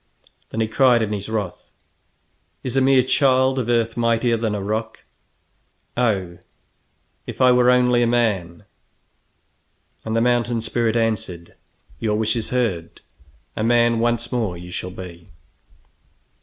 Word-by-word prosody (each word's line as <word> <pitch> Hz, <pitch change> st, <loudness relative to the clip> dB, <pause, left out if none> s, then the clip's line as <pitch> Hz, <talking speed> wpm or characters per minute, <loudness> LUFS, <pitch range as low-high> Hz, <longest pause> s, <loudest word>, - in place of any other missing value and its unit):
Then 115 Hz, -, -3 dB
he 110 Hz, -, +1 dB
cried 120 Hz, 0 st, +3 dB
in 105 Hz, -1 st, -2 dB
his 100 Hz, 0 st, -5 dB
wrath: 105 Hz, -5 st, -4 dB, 0.9 s
"Is 130 Hz, -1 st, -4 dB
a 135 Hz, -, +3 dB
mere 130 Hz, -1 st, +4 dB
child 130 Hz, -1 st, +2 dB
of 120 Hz, -2 st, -3 dB
earth 115 Hz, -1 st, +1 dB
mightier 115 Hz, 0 st, +1 dB
than 110 Hz, -2 st, -2 dB
a 100 Hz, -, -4 dB
rock? 110 Hz, +2 st, -4 dB, 0.9 s
Oh, 95 Hz, -8 st, -1 dB, 0.9 s
if -, -, -7 dB
I 130 Hz, -1 st, +6 dB
were 125 Hz, 0 st, +4 dB
only 125 Hz, -1 st, +4 dB
a 120 Hz, -, +3 dB
man!" 105 Hz, -8 st, 0 dB, 1.4 s
And 110 Hz, -, -3 dB
the -, -, +3 dB
mountain 120 Hz, -1 st, +1 dB
spirit 115 Hz, 0 st, -1 dB
answered: 105 Hz, -7 st, -2 dB, 0.5 s
"Your 105 Hz, -2 st, 0 dB
wish 110 Hz, +1 st, 0 dB
is 115 Hz, -2 st, -3 dB
heard. 110 Hz, -10 st, -2 dB, 0.5 s
A 110 Hz, -, -2 dB
man 120 Hz, 0 st, +3 dB
once 120 Hz, 0 st, 0 dB
more 110 Hz, -8 st, -2 dB
you 90 Hz, +1 st, -10 dB
shall 90 Hz, -, -5 dB
be!" 90 Hz, -2 st, -10 dB
115 Hz, 140 wpm, -21 LUFS, 105-120 Hz, 1.4 s, I